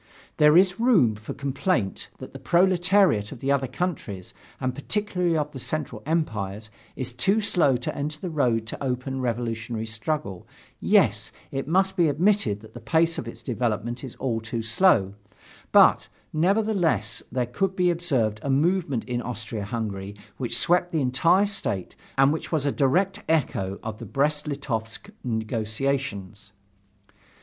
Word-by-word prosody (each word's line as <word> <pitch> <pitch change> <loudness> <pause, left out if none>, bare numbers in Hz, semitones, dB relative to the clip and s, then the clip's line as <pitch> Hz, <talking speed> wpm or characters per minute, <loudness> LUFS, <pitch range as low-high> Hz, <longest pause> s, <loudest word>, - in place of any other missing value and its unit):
There 150 +2 +6
is 185 +1 +4
room 215 - +4
for 105 +1 -8
complaint 140 - -1
that - - -10
the - - -8
proletariat 180 - +3
of 135 - -8
the 135 +3 0
other 135 -1 +1
countries, 115 - -4 0.3
and 130 -1 -1
particularly 180 +2 0
of 150 -1 -1
the 135 - -8
Central 130 -5 -4
Empires, 110 - -2 0.2
is 130 -2 -3
too 195 - +2
slow 170 - +2
to 125 - -4
enter 150 +2 -3
the 180 0 -5
road 115 -7 0
of - - -8
open 130 0 -2
revolutionary 115 -2 -2
struggle, 115 - -4 0.3
yes, - - +3 0.2
it 135 0 -3
must 190 +3 +2
be 170 -4 +3
admitted 150 - +1
that 110 - -15
the 120 - -8
pace 165 +7 +1
of 115 - -6
its 115 0 -9
development 120 0 -2
is 130 - -7
all 120 -4 -2
too 115 +1 -4
slow 110 - +3 0.6
but, - - +6 0.3
nevertheless, 175 - +1
there 125 0 0
could 190 +11 -1
be 180 -1 +3
observed 130 -12 0
a 140 - -4
movement 145 -2 +1
in 125 -1 -3
Austria 115 -3 -5
Hungary 100 -3 -4 0.2
which 120 -2 -1
swept 175 +5 +3
the 160 - 0
entire 165 +10 +3
state 195 - -3 0.2
and 135 +2 +5
which 160 - -5
was 155 -4 0
a 140 - +2
direct 185 +10 +1
echo 100 -11 0
of 110 -1 -5
the - - -8
Brest 150 +2 0
Litovsk 135 - -4
negotiations. 110 -2 -3
135 Hz, 155 wpm, -25 LUFS, 115-170 Hz, 0.6 s, There